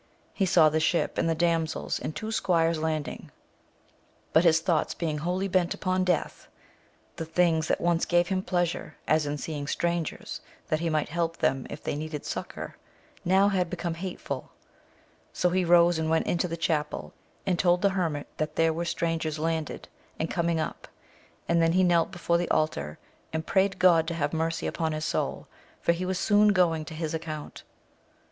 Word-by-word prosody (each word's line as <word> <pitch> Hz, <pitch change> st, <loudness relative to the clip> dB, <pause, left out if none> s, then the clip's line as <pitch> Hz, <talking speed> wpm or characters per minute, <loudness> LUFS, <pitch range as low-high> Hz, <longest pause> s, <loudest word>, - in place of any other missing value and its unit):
He 195 Hz, -, +1 dB
saw 170 Hz, -4 st, +6 dB
the 155 Hz, +1 st, +1 dB
ship, 165 Hz, +2 st, +1 dB
and 165 Hz, -, +1 dB
the 165 Hz, -, +1 dB
damsels 165 Hz, -1 st, 0 dB
and 155 Hz, -, -5 dB
two 220 Hz, +7 st, -4 dB
squires 170 Hz, -6 st, +2 dB
landing; 155 Hz, -2 st, -3 dB, 1.0 s
but 160 Hz, -, +6 dB
his 165 Hz, -2 st, +5 dB
thoughts 165 Hz, -1 st, 0 dB
being 155 Hz, -3 st, -2 dB
wholly 180 Hz, +5 st, -1 dB
bent 185 Hz, -2 st, +1 dB
upon 185 Hz, -1 st, 0 dB
death, 180 Hz, -3 st, -1 dB, 0.7 s
the -, -, -3 dB
things 160 Hz, -1 st, +2 dB
that -, -, +1 dB
once 170 Hz, -1 st, +1 dB
gave 175 Hz, +1 st, +2 dB
him 190 Hz, -1 st, 0 dB
pleasure, 175 Hz, -4 st, -1 dB
as 155 Hz, -1 st, +2 dB
in 145 Hz, +1 st, -2 dB
seeing 145 Hz, -1 st, -5 dB
strangers, 170 Hz, +1 st, -2 dB, 0.3 s
that 155 Hz, -, +1 dB
he 165 Hz, 0 st, -1 dB
might 155 Hz, -2 st, 0 dB
help 165 Hz, +1 st, -1 dB
them 135 Hz, -1 st, 0 dB
if -, -, -8 dB
they -, -, -2 dB
needed 150 Hz, 0 st, -5 dB
succour, -, -, -5 dB, 0.5 s
now 190 Hz, +3 st, +4 dB
had 185 Hz, -3 st, 0 dB
become 170 Hz, 0 st, -3 dB
hateful 180 Hz, +2 st, -5 dB, 0.8 s
So 180 Hz, -, +1 dB
he 185 Hz, +1 st, +2 dB
rose 170 Hz, -1 st, +5 dB
and 160 Hz, 0 st, -1 dB
went 160 Hz, 0 st, +2 dB
into 175 Hz, +1 st, 0 dB
the 165 Hz, -1 st, -4 dB
chapel, 160 Hz, -3 st, -2 dB, 0.3 s
and 180 Hz, -3 st, 0 dB
told 175 Hz, 0 st, +3 dB
the 200 Hz, -, +5 dB
hermit 165 Hz, -7 st, -1 dB
that 155 Hz, 0 st, -2 dB
there 165 Hz, 0 st, +3 dB
were 170 Hz, +2 st, -2 dB
strangers 165 Hz, -2 st, -1 dB
landed 160 Hz, -1 st, -2 dB, 0.3 s
and 160 Hz, -, -2 dB
coming 170 Hz, -1 st, 0 dB
up; 155 Hz, -, -4 dB, 0.6 s
and 170 Hz, 0 st, +3 dB
then 165 Hz, 0 st, +3 dB
he 185 Hz, +1 st, +4 dB
knelt 170 Hz, -2 st, +3 dB
before 170 Hz, -1 st, 0 dB
the 175 Hz, -, -2 dB
altar, 75 Hz, -, 0 dB, 0.3 s
and 160 Hz, 0 st, -3 dB
prayed 195 Hz, 0 st, +2 dB
God 170 Hz, -3 st, +5 dB
to 170 Hz, -, -2 dB
have 145 Hz, -2 st, -1 dB
mercy 165 Hz, +1 st, -1 dB
upon 160 Hz, -2 st, -1 dB
his 155 Hz, 0 st, -3 dB
soul, -, -, -2 dB, 0.3 s
for -, -, +2 dB
he 175 Hz, +2 st, -2 dB
was 185 Hz, 0 st, -1 dB
soon 210 Hz, +2 st, +4 dB
going 165 Hz, -4 st, +2 dB
to 160 Hz, -, -8 dB
his 160 Hz, -1 st, -3 dB
account. 155 Hz, -2 st, -5 dB
165 Hz, 185 wpm, -27 LUFS, 160-175 Hz, 1.0 s, saw